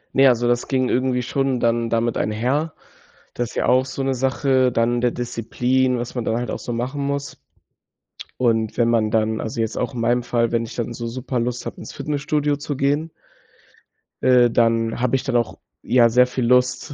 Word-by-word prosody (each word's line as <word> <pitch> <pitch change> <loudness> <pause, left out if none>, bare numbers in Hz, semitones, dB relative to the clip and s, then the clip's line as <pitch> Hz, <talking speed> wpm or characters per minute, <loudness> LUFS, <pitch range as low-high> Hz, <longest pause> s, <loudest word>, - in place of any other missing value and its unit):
Ne, 135 0 +6
also, 120 -1 +3
das 120 0 0
ging 130 -2 0
irgendwie 125 0 +1
schon 135 0 -1
dann 115 0 +1
damit 115 0 0
einher. 130 +9 -1 0.6
Das 120 -1 -3
ist - - -14
ja - - 0
auch 130 +1 +4
so 135 +1 -4
'ne 135 0 0
Sache 130 0 +1
dann 120 +1 +1
der 120 -1 +2
Disziplin, 125 +2 0
was 120 +1 -5
man 120 -3 -3
dann 110 - 0
halt 120 - -3
auch - - -4
so 120 - -5
machen 125 +5 -3
muss. 140 0 -4 1.0
Und, 115 -3 +1
wenn 115 -1 +2
man 110 -2 +1
dann 110 0 +1
also 115 +1 -3
jetzt 110 - -2
auch 125 - -2
in 120 - -5
meinem 120 +1 +1
Fall, 115 -1 0
wenn 115 0 +1
ich 115 - -9
dann 120 0 -4
so 120 - -5
super 125 +1 -3
Lust 120 +1 -3
habe, - - -7
ins - - -9
Fitnessstudio 150 0 -1
zu 145 0 -4
gehen 145 +4 0 1.1
äh, 125 -2 +5
dann 115 0 +1
habe 125 +1 +1
ich 130 - -1
dann 130 - -2
auch, 120 -1 0 0.2
ja, 120 -2 +4
sehr 125 +2 +4
viel 125 -1 -2
Lust, 125 +3 +2
125 Hz, 205 wpm, -21 LUFS, 115-130 Hz, 1.1 s, Ne